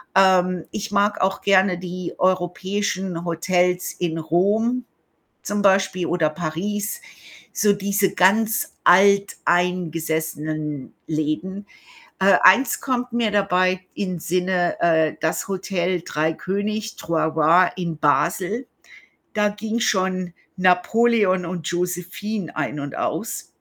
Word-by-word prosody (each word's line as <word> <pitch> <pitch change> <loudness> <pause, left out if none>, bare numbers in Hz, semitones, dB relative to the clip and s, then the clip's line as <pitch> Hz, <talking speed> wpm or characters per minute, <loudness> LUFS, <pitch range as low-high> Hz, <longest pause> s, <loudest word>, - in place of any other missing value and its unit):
Ähm, 185 -2 +3
ich 215 0 -5
mag 205 0 +1
auch 190 +1 0
gerne 190 -2 +3
die 180 0 -6
europäischen 185 0 -1
Hotels 180 +1 0
in 165 -2 -1
Rom 210 +10 +1 0.6
zum 205 0 -2
Beispiel 190 -2 +2
oder 165 -3 +1
Paris, 200 - -3 0.5
so 210 -1 +3
diese 200 0 0
ganz 210 +4 +2
alteingesessenen 165 -6 +1
Läden. 160 +6 -3 0.5
Äh, 195 +1 +5
eins 235 +8 +5
kommt 250 -2 -2
mir 230 -3 +1
dabei 185 -2 +1
in 185 -4 -3
Sinne, 180 +1 0
äh, 160 -2 +2
das 160 +4 -1
Hotel 185 -2 -1
Drei 155 +2 0
König, 210 +5 -3
Trois 165 -1 -1
Rois 165 +4 +5
in 170 -4 -4
Basel. 180 - 0 0.7
Da 210 -1 +2
ging 220 +2 -4
schon 185 -4 0 0.2
Napoleon 185 +1 +3
und 170 -1 -5
Josephine 180 +2 -3
ein 150 - -3
und 140 -1 -6
aus. - - -3
185 Hz, 110 wpm, -22 LUFS, 170-205 Hz, 0.7 s, Äh